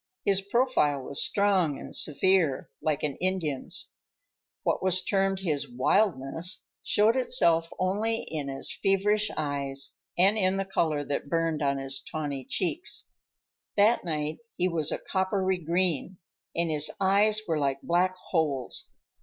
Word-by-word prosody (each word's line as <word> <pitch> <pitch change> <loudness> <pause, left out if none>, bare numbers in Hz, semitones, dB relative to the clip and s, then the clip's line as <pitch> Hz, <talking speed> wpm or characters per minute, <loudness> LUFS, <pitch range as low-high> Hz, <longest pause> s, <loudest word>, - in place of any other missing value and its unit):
His 195 -1 +3
profile 200 - +1
was 140 - -2
strong 190 -8 +2
and - - -6
severe, 160 -1 +2
like 155 -1 -1
an 145 -3 -2
Indian's. 185 - -2 0.7
What - - 0
was 185 0 +3
termed 195 -1 +1
his 155 -6 -1
"wildness" 140 - +1 0.2
showed 215 +3 +3
itself 170 -11 +2
only 210 +5 0
in 150 -3 -4
his 135 0 -3
feverish 205 +2 +2
eyes 140 -2 -2 0.2
and 195 +5 +4
in 190 0 +2
the 195 - -1
color 160 -6 0
that 140 0 -3
burned 165 -1 0
on 140 -1 +1
his 135 0 -4
tawny 145 -4 -4
cheeks. 255 - -2 0.7
That 215 +4 +4
night 155 0 -2 0.2
he 180 - +2
was 165 -4 -1
a - - -1
coppery 190 -1 0
green, 175 +1 0 0.4
and 170 -1 +2
his 150 -1 +1
eyes 205 +2 +3
were 160 -3 0
like 140 -1 -1
black 180 +2 +2 0.2
holes. 145 -7 -1
170 Hz, 140 wpm, -28 LUFS, 150-195 Hz, 0.7 s, and